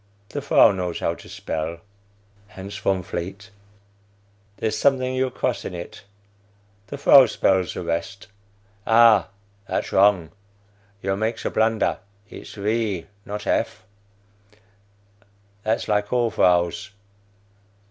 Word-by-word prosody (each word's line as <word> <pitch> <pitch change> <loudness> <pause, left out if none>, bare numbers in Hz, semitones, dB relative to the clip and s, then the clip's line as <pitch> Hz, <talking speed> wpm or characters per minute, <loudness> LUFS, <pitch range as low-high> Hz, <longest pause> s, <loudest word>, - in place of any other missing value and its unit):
The 145 - -4
vrow 140 -7 +5
knows 90 -2 -3
how 85 - 0
to - - -13
spell. 80 +1 -5 0.7
(Hans 100 0 -9
Von 95 -3 0
Vleet.) 95 +3 -6 1.1
There's 110 - -1
a - - -2
something 130 -1 +2
you 130 0 0
cross - - -2
in 90 - -6
it. 85 +2 -9 0.8
The 140 - -6
vrow 135 -3 +7
spells 95 -2 +1
the - - -4
rest. 85 +4 -4 0.6
Ah, 115 -4 +6 0.4
that's - - -2
wrong; 95 -4 +3 0.7
you 95 0 0
makes 110 +3 -3
a - - -1
blunder. 110 0 +1 0.3
Its - - -11
V. 105 -3 -1 0.2
not 105 +1 -5
F. 95 - -1 1.8
That's 110 +1 -1
like 105 -1 0
all 120 -2 +1
vrows. 90 -3 +2
105 Hz, 120 wpm, -23 LUFS, 90-115 Hz, 1.8 s, vrow